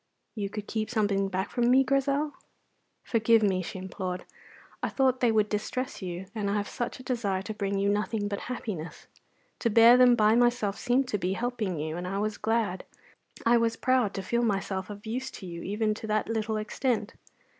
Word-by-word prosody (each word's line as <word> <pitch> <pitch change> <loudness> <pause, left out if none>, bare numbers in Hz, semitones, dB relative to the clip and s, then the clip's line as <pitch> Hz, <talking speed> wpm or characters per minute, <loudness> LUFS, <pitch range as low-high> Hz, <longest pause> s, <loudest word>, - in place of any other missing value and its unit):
"You 205 -3 -3
could 210 0 -6
keep 215 -1 -2
something 205 -4 +1
back 190 +1 -2
from 240 -1 +2
me, 265 +2 +6
Grizel?" 275 +2 +1 0.7
"Forgive 225 -1 +3
me," 190 -3 +2
she 185 +2 -6
implored; 185 -1 -5 0.6
"I - - 0
thought 260 -2 +2
they 240 -2 +3
would 215 -1 +3
distress 215 +6 -3
you, 180 0 -5
and 210 -3 -2
I 200 - 0
had 205 -1 0
such 240 +4 -4
a - - -10
desire 205 -7 -1
to 215 - -5
bring 200 -1 -2
you 200 +1 +1
nothing 205 +1 0
but 200 -1 -3
happiness. 195 -9 -5 0.5
To 235 - +1
bear 230 +2 +8
them 250 -1 +7
by 215 -1 +4
myself 240 -4 +2
seemed 255 +1 +2
to 210 - -1
be 185 +2 0
helping 225 -5 -2
you, 155 +2 -3
and 180 +1 -4
I 195 +2 -2
was 210 +1 -2
glad, 220 -4 0 0.6
I 235 +1 +5
was 230 -1 +1
proud, 255 -5 +1
to 195 - -3
feel 235 +5 0
myself 195 -3 -1
of 205 +1 -9
use 255 +4 -3
to 190 - -9
you 170 -1 -7
even 215 +2 0
to 220 +1 -7
that 215 0 0
little 220 -1 -1
extent. 220 +1 -1
215 Hz, 200 wpm, -28 LUFS, 195-240 Hz, 0.7 s, bear